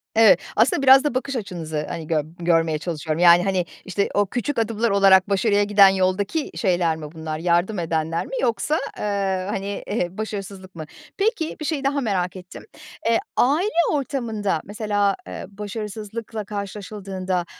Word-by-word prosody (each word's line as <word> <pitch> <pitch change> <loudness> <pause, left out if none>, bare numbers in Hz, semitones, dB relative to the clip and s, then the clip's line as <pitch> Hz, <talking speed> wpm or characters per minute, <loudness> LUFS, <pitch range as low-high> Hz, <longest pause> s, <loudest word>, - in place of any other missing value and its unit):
Evet. 220 -2 +7 0.2
Aslında 235 +5 +3
biraz 270 0 +7
da 295 - 0
bakış 265 +1 -2
açınızı, 160 -8 -4
hani, 160 -2 -5
gör 155 -3 +1 0.2
görmeye 165 -2 +2
çalışıyorum. 160 -1 -3
Yani, 175 0 +7
hani, 185 -2 0 0.2
işte, 200 +2 -1
o 205 - +3
küçük 245 +5 -2
adımlar 225 +1 0
olarak 195 -1 +5
başarıya 205 +1 +2
giden 200 -1 +6
yoldaki 190 - 0
şeyler 175 -5 +1
mi 150 -1 -8
bunlar? 160 -1 -5
Yardım 175 +4 +1
edenler 165 0 -1
mi - - -12
yoksa, 270 +6 0 0.2
eee, 195 -2 -1
hani, 200 -1 -4
ehe, 190 -4 -2
başarısızlık 195 -3 -6
mı? 155 -2 -6 0.3
Peki 400 -6 0
bir 305 - -5
şeyi 290 -3 -2
daha 280 +1 0
merak 190 -6 -1
ettim. 180 -1 -11 0.4
E, 230 - +4 0.2
aile 305 +11 +3 0.2
ortamında 230 - -1
mesela, 205 -1 0
eee, - - -7
başarısızlıkla 210 +1 -6
karşılaşıldığında 195 -3 -4
200 Hz, 155 wpm, -22 LUFS, 180-225 Hz, 0.4 s, Evet